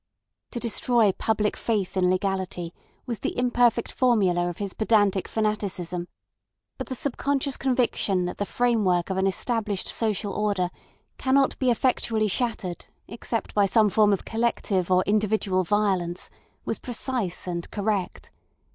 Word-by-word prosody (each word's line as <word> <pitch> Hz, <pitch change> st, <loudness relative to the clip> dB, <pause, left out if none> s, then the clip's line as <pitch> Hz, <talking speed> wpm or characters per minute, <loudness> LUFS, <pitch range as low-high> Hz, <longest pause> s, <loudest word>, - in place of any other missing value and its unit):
To 240 Hz, -, -4 dB
destroy 235 Hz, -2 st, +2 dB
public 210 Hz, +1 st, 0 dB
faith 205 Hz, -6 st, -1 dB
in 185 Hz, -1 st, +3 dB
legality 185 Hz, -2 st, -2 dB, 0.3 s
was 235 Hz, -3 st, -4 dB
the -, -, -3 dB
imperfect 245 Hz, -2 st, +2 dB
formula 190 Hz, -9 st, +2 dB
of 175 Hz, -, -7 dB
his 200 Hz, -2 st, -4 dB
pedantic 205 Hz, -3 st, +2 dB
fanaticism; 190 Hz, -5 st, -2 dB, 0.7 s
but -, -, -4 dB
the 260 Hz, -, -4 dB
subconscious 280 Hz, +1 st, -1 dB
conviction 240 Hz, -8 st, +1 dB
that 180 Hz, -, -5 dB
the 205 Hz, -, -1 dB
framework 205 Hz, -8 st, +1 dB
of 190 Hz, -, -2 dB
an 190 Hz, 0 st, +2 dB
established 210 Hz, 0 st, -1 dB
social 210 Hz, -2 st, 0 dB
order 200 Hz, -4 st, 0 dB, 0.5 s
cannot 270 Hz, +1 st, +3 dB
be 260 Hz, -, +2 dB
effectually 230 Hz, -3 st, +1 dB
shattered 205 Hz, -5 st, -2 dB, 0.2 s
except 230 Hz, -1 st, -4 dB
by 205 Hz, -1 st, +3 dB
some 215 Hz, +1 st, +4 dB
form 210 Hz, +1 st, +4 dB
of 195 Hz, -, -1 dB
collective 220 Hz, -5 st, 0 dB
or 185 Hz, 0 st, +4 dB
individual 205 Hz, -2 st, +1 dB
violence 185 Hz, -3 st, 0 dB, 0.3 s
was -, -, -2 dB
precise 245 Hz, -6 st, -2 dB
and 170 Hz, -1 st, -4 dB
correct. 205 Hz, -2 st, -2 dB
210 Hz, 140 wpm, -25 LUFS, 185-235 Hz, 0.7 s, some